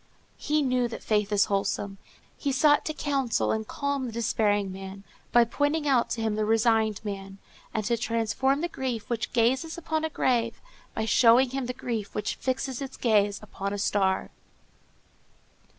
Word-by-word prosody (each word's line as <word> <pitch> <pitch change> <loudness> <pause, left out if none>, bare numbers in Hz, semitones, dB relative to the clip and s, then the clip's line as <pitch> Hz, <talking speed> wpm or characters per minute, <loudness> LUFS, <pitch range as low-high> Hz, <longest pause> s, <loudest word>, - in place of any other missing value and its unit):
He 300 0 +1
knew 250 -2 +1
that 235 - -8
faith 210 -1 +1
is 205 -1 +4
wholesome. 195 0 -2 0.4
He 280 - -2
sought 290 +2 +4
to 310 - -2
counsel 275 -6 0
and 220 0 -2
calm 280 -2 -2
the - - -5
despairing 210 -3 +1
man, 195 +1 -8 0.3
by 240 -1 +6
pointing 290 +5 0
out 255 -4 +3
to 225 - -2
him 220 -1 0
the 215 0 0
resigned 220 -1 +2
man, 195 -1 -6 0.3
and 215 -2 -2
to 235 +2 +2
transform 230 +5 0
the 345 - 0
grief 250 -8 -4
which 225 -2 -2
gazes 260 +8 +1
upon 320 -2 -2
a 320 - 0
grave 235 -5 0 0.4
by 220 - -1
showing 245 +2 +5
him 265 -2 -3
the - - -1
grief 230 -5 -4
which 210 - -1
fixes 260 0 -3
its 270 -1 -6
gaze 205 -4 +2
upon 200 -1 -4
a - - -2
star. 195 -1 0
230 Hz, 170 wpm, -27 LUFS, 210-265 Hz, 0.4 s, by